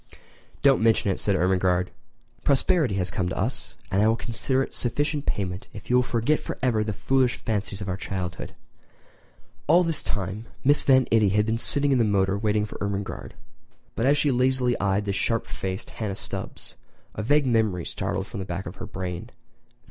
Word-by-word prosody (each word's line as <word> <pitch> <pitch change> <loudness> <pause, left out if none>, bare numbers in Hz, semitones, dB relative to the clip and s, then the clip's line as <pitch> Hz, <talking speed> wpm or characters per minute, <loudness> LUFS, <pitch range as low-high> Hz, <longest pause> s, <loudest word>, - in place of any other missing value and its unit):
"Don't 140 -4 +5
mention 110 -3 +3
it," - - -3
said 100 - +1
Ermengarde, 90 0 +1 0.5
"prosperity 140 - +2
has 90 -1 -1
come 90 -2 -1
to - - -4
us, 120 +7 -3
and 100 +1 +2
I 105 - +4
will 110 - +3
consider 130 +3 0
it - - -8
sufficient 145 +4 -1
payment 95 -1 -2
if 105 +3 -8
you 125 - +5
will - - +5
forget 125 +5 +1
forever 120 -4 -1
the 105 - -2
foolish 130 +4 +1
fancies 105 -2 -3
of 100 - -5
our 95 0 -2
childhood." 90 -3 -5 1.1
All 170 +4 +6
this 165 -2 -1
time 100 +2 -4 0.2
Mrs. 145 +2 +5
Van 130 -2 +5
Itty 110 -3 +4
had 105 +2 +2
been 110 +1 -1
sitting 145 +3 +3
in 130 - +3
the - - +4
motor 100 -2 +2
waiting 105 0 +1
for 105 - -9
Ermengarde; 100 -1 -4 0.6
but 115 - +1
as 145 +1 +4
she 145 -1 +2
lazily 125 -1 +2
eyed 100 +1 +1
the 100 - -1
sharp 115 +3 0
faced 95 0 -5
Hannah 105 -4 -4
Stubbs - - -6 0.4
a - - -4
vague 145 +6 +3
memory 110 -8 +1
started 95 - -2
from 100 - -7
the - - -3
back 90 +2 -4
of - - -8
her - - -7
brain. 90 +4 -5
110 Hz, 190 wpm, -25 LUFS, 95-130 Hz, 1.1 s, All